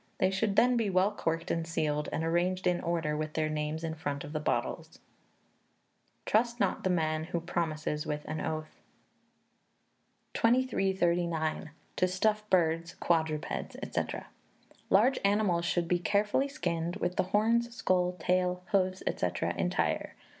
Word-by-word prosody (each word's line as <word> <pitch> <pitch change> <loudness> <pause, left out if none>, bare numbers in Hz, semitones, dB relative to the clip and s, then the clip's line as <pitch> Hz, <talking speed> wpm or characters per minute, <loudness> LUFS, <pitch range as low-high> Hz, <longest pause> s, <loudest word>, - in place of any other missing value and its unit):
They 185 - +2
should 195 +1 0
then 250 +2 +5
be 225 -3 +1
well 190 +2 +3
corked 165 -4 -2
and 165 -1 -1
sealed, 150 -3 -1
and 160 - -1
arranged 175 +3 0
in 180 -1 +2
order, 165 -3 -1
with 155 0 -3
their 155 -1 0
names 155 +1 -2
in 160 -1 -2
front 145 -3 -4
of 145 - -8
the 155 - -1
bottles." 150 - -2 1.3
[TRUST 235 +2 +2
NOT - - 0
THE 185 - +1
MAN 155 -3 0
WHO 170 0 -3
PROMISES 155 -2 -2
WITH 150 -1 -3
AN 155 +1 -3
OATH.] 155 0 -4 1.6
2339. 175 -10 +1 0.3
To 185 - +3
Stuff 210 +3 0
Birds, 165 -2 +2
Quadrupeds, 160 -3 -1 0.2
&c. - - +1 0.9
Large 230 +8 +4
animals 200 -4 +2
should 170 0 0
be 175 0 +2
carefully 205 +8 +1
skinned, 175 - -2
with 180 -3 -2
the - - +3
horns, 230 +4 +2
skull, 180 -5 +1
tail, 180 +1 0
hoofs, 185 -1 +1
&c., - - 0 0.3
entire. - - -1
175 Hz, 145 wpm, -30 LUFS, 160-195 Hz, 1.6 s, then